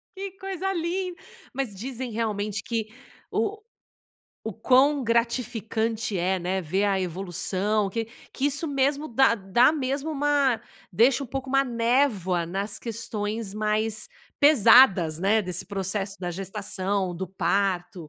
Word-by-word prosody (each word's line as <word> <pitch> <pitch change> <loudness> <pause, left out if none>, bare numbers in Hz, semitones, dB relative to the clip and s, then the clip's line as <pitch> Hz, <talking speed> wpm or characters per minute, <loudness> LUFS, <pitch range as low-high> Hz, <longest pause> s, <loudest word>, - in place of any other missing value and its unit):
Que 390 0 -5
coisa 385 0 -3
lin 360 +1 -2 0.4
Mas 265 -5 -3
dizem 250 +3 -5
realmente 210 -2 -2
que 225 -2 -2 0.4
o 425 +1 -1 0.8
o 220 - -5
quão 265 +4 +3
gratificante 230 -2 -1
é, 185 +2 0
né, 185 +1 -2
ver 190 +6 0
a 195 -1 +2
evolução 190 +3 -1
que 225 +1 -3 0.3
que 275 - 0
isso 290 +3 0
mesmo 280 +1 0
dá 250 -1 +3
dá 225 +5 +3
mesmo 280 0 -2
uma 285 -4 +2 0.3
deixa 240 +9 +3
um - - -5
pouco 265 +1 -5
uma 275 0 +4
névoa 230 -8 +1
nas 200 +4 -3
questões 220 -2 -4
mais 215 0 -1 0.3
pesadas, 205 - +6
né, 205 +4 +2
desse 180 -1 -3
processo 195 0 -3
da 180 -2 -4
gestação, 195 0 -2
do 190 +2 -4
parto, 185 -3 -1
220 Hz, 135 wpm, -25 LUFS, 195-265 Hz, 0.8 s, pesadas